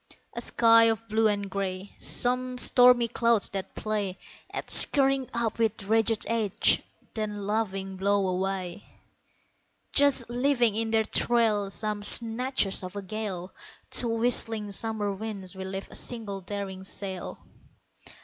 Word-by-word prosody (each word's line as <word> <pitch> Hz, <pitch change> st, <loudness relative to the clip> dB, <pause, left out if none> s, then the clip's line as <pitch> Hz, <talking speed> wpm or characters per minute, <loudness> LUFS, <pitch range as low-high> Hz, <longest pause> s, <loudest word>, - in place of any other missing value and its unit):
A -, -, -4 dB
sky 230 Hz, -1 st, +5 dB
of 225 Hz, 0 st, -1 dB
blue 220 Hz, +1 st, +2 dB
and 205 Hz, -1 st, -1 dB
grey; 195 Hz, 0 st, -5 dB
Some 250 Hz, +1 st, +1 dB
stormy 245 Hz, -1 st, +6 dB
clouds 230 Hz, -2 st, +1 dB
that 195 Hz, -1 st, -6 dB
play 205 Hz, -3 st, -3 dB, 0.3 s
At -, -, -5 dB
scurrying 270 Hz, -2 st, +4 dB
up 230 Hz, -1 st, -3 dB
with 220 Hz, -2 st, -1 dB
ragged 225 Hz, +1 st, +1 dB
edge, 220 Hz, -4 st, +1 dB, 0.3 s
then 210 Hz, -2 st, -4 dB
laughing 195 Hz, -3 st, -3 dB
blow 200 Hz, 0 st, +1 dB
away, 185 Hz, 0 st, -3 dB, 1.1 s
Just 280 Hz, -4 st, +4 dB
leaving 245 Hz, -2 st, +1 dB
in 225 Hz, 0 st, -2 dB
their 220 Hz, 0 st, +2 dB
trail 215 Hz, -3 st, +1 dB
Some 210 Hz, +2 st, -4 dB
snatches 230 Hz, -1 st, +2 dB
of 185 Hz, +2 st, -8 dB
a 200 Hz, -, -5 dB
gale; 190 Hz, -3 st, -6 dB, 0.4 s
To 240 Hz, -, +6 dB
whistling 225 Hz, -2 st, +1 dB
summer 210 Hz, 0 st, -2 dB
winds 195 Hz, -2 st, -6 dB
we 190 Hz, 0 st, -7 dB
lift 195 Hz, +1 st, -7 dB
a -, -, -11 dB
single 215 Hz, -5 st, -4 dB
daring 190 Hz, 0 st, -6 dB
sail. 190 Hz, -1 st, -6 dB
215 Hz, 135 wpm, -26 LUFS, 195-230 Hz, 1.1 s, stormy